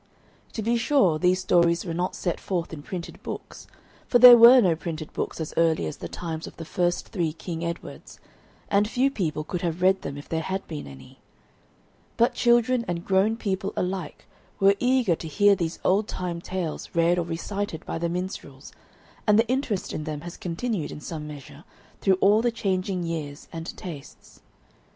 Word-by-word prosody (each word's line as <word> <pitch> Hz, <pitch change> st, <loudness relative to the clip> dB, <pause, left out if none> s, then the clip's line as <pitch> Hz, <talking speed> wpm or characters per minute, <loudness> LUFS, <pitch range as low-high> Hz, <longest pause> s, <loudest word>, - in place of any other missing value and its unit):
To 220 Hz, -, -4 dB
be 235 Hz, +2 st, +1 dB
sure, 215 Hz, -, +3 dB
these 180 Hz, +1 st, +2 dB
stories 170 Hz, -1 st, +3 dB
were 170 Hz, -, -3 dB
not 180 Hz, +2 st, -2 dB
set 175 Hz, -, -2 dB
forth 175 Hz, -3 st, -3 dB
in 150 Hz, -, -7 dB
printed 175 Hz, +3 st, -7 dB
books, -, -, -8 dB, 0.4 s
for 245 Hz, -, +4 dB
there 245 Hz, 0 st, +11 dB
were 240 Hz, +2 st, +9 dB
no 180 Hz, -8 st, +3 dB
printed 160 Hz, -1 st, -6 dB
books -, -, -4 dB
as 160 Hz, -, -4 dB
early 165 Hz, -, +2 dB
as 80 Hz, -, -5 dB
the -, -, -6 dB
times 165 Hz, -2 st, -5 dB
of -, -, -12 dB
the 165 Hz, -, -7 dB
first 175 Hz, +2 st, -1 dB
three 170 Hz, -6 st, -1 dB
King 165 Hz, 0 st, -6 dB
Edwards, 170 Hz, 0 st, -7 dB, 0.5 s
and 205 Hz, +1 st, +2 dB
few 260 Hz, +3 st, +2 dB
people 155 Hz, -, -2 dB
could 170 Hz, +3 st, -4 dB
have 170 Hz, 0 st, -2 dB
read 190 Hz, +1 st, +4 dB
them 140 Hz, -, -6 dB
if 145 Hz, -, -10 dB
there 160 Hz, 0 st, -2 dB
had 190 Hz, +4 st, -4 dB
been 155 Hz, -3 st, -6 dB
any. 65 Hz, -1 st, -13 dB, 1.0 s
But 240 Hz, +2 st, +3 dB
children 240 Hz, 0 st, +3 dB
and 175 Hz, -1 st, -3 dB
grown 200 Hz, +4 st, +2 dB
people 195 Hz, -2 st, -2 dB
alike 180 Hz, -1 st, -4 dB, 0.3 s
were 195 Hz, 0 st, +6 dB
eager 250 Hz, -8 st, +2 dB
to 160 Hz, -, -8 dB
hear 205 Hz, +6 st, +4 dB
these 170 Hz, -3 st, -3 dB
old 205 Hz, +3 st, +2 dB
time 175 Hz, -2 st, -4 dB
tales 180 Hz, -3 st, -4 dB
read 170 Hz, +1 st, +3 dB
or -, -, 0 dB
recited 170 Hz, +1 st, -4 dB
by -, -, -4 dB
the 170 Hz, 0 st, -1 dB
minstrels, 180 Hz, +3 st, -6 dB, 0.5 s
and 210 Hz, 0 st, +5 dB
the 225 Hz, +1 st, +3 dB
interest 250 Hz, -6 st, -1 dB
in 155 Hz, -, -4 dB
them 150 Hz, -2 st, -4 dB
has 170 Hz, +1 st, -8 dB
continued 180 Hz, 0 st, -3 dB
in -, -, -7 dB
some 150 Hz, 0 st, -6 dB
measure 145 Hz, 0 st, -11 dB, 0.4 s
through 190 Hz, -2 st, +3 dB
all 210 Hz, +3 st, +5 dB
the 240 Hz, -, +2 dB
changing 190 Hz, -4 st, -1 dB
years 155 Hz, -4 st, -5 dB
and 165 Hz, 0 st, -6 dB
tastes. 155 Hz, -7 st, -10 dB
180 Hz, 190 wpm, -25 LUFS, 165-205 Hz, 1.0 s, there